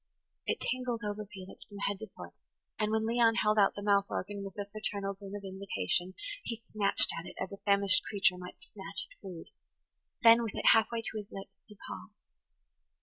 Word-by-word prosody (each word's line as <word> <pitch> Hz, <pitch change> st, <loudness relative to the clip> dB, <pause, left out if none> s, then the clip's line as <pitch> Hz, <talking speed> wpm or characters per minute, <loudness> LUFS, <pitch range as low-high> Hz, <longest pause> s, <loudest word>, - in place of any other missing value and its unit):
It -, -, 0 dB
tingled 250 Hz, -2 st, -1 dB
over 210 Hz, 0 st, -3 dB
Felix 190 Hz, -3 st, -10 dB
from 205 Hz, -, -11 dB
head 200 Hz, -1 st, -2 dB
to 220 Hz, -, -6 dB
foot; -, -, -9 dB, 0.5 s
and, 215 Hz, 0 st, +1 dB
when 220 Hz, 0 st, +1 dB
Leon 230 Hz, 0 st, +4 dB
held 215 Hz, -1 st, +3 dB
out 200 Hz, -, +4 dB
the 205 Hz, -, -6 dB
mouth 200 Hz, -1 st, +3 dB
organ 200 Hz, +1 st, -3 dB
with 195 Hz, -1 st, -8 dB
a 205 Hz, -, -2 dB
fraternal 200 Hz, -1 st, -3 dB
grin 195 Hz, 0 st, -9 dB
of 205 Hz, -, -6 dB
invitation, 185 Hz, -, -1 dB, 0.3 s
he 230 Hz, -, -3 dB
snatched 215 Hz, -3 st, +3 dB
at 165 Hz, -, -8 dB
it -, -, -10 dB
as 190 Hz, -, -3 dB
a 200 Hz, -, -7 dB
famished 200 Hz, -2 st, +6 dB
creature 195 Hz, -3 st, +2 dB
might 180 Hz, 0 st, -10 dB
snatch 195 Hz, -1 st, -5 dB
at -, -, -21 dB
food. 180 Hz, -4 st, -9 dB, 0.7 s
Then, 230 Hz, 0 st, +9 dB
with 225 Hz, -3 st, -3 dB
it -, -, +4 dB
half 225 Hz, -1 st, +5 dB
way 230 Hz, -1 st, -2 dB
to 220 Hz, -, -4 dB
his 205 Hz, -, -8 dB
lips, 195 Hz, 0 st, -9 dB
he 210 Hz, -2 st, -15 dB
paused. 95 Hz, 0 st, -11 dB
200 Hz, 205 wpm, -32 LUFS, 195-215 Hz, 0.7 s, Then